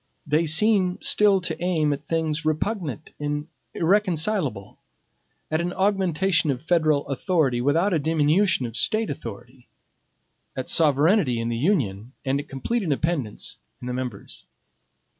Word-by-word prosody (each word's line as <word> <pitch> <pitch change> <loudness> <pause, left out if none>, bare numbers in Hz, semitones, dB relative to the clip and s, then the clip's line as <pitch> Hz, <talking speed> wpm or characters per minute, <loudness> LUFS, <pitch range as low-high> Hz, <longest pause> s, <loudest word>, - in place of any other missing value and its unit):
They 155 +2 +1
seem 185 +2 +3
still 200 -2 +4
to 170 - -3
aim 160 -5 +1
at 145 +1 -8
things 160 -1 -1
repugnant 155 - -2
and 150 +1 -3 0.3
irreconcilable; 170 - 0 0.7
at 155 +1 +1
an 175 +1 -2
augmentation 190 -4 +1
of 130 0 -2
federal 155 -4 +2
authority, 140 -3 0
without 165 +9 +2
a 165 - +2
diminution 160 +2 +2
of 115 -1 -7
State 220 - +1
authority; 120 +1 -9 0.9
at 130 - -4
sovereignty 150 - +3
in 115 0 -2
the 120 - -2
Union, 125 - -1
and 140 +2 -1
complete 230 - -2
independence 150 - -2 0.2
in - - -9
the 125 - -3
members. 125 -5 -7
155 Hz, 130 wpm, -24 LUFS, 135-180 Hz, 0.9 s, still